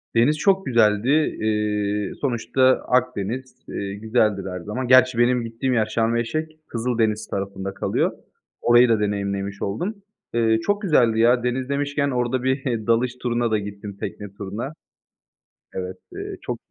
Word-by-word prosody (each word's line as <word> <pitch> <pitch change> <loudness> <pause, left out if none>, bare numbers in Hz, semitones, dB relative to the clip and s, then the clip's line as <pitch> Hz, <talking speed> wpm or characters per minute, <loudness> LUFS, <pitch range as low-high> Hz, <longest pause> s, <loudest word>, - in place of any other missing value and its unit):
Deniz 125 +7 +4
çok 195 +4 +2
güzeldi. 110 -1 +3
Eee, 105 -7 0
sonuçta 130 -1 -1 0.3
Akdeniz. 125 +1 -1
Eee, 100 0 -4
güzeldir 105 -2 +1
her 90 0 -5
zaman. 105 +8 -4
Gerçi 130 -1 +6
benim 120 0 +3
gittiğim 115 +3 -2
yer 110 -3 +3
Sharm 115 +2 0
El 120 - +2
Sheikh. 155 +7 -3 0.2
Kızıldeniz 115 -2 -1
tarafında 95 0 -4
kalıyor. - - 0 0.5
Orayı 120 +1 +6
da 115 -2 +3
deneyimlemiş 100 -1 -2
oldum. 175 - -2 0.4
Eee, 115 -1 +3
çok 205 +1 0
güzeldi 120 - +3
ya. 120 +1 +4
Deniz 125 +1 -1
demişken 140 0 0
orada 125 0 0
bir 130 -4 -1
dalış 120 +2 +2
turuna 120 -1 0
da 110 - +3
gittim, 100 0 -7
tekne 105 -2 -6
turuna. 105 +8 -5 1.0
Evet, 95 0 -4 0.2
eee, - - -6
çok - - -4
115 Hz, 145 wpm, -23 LUFS, 105-130 Hz, 1.0 s, Gerçi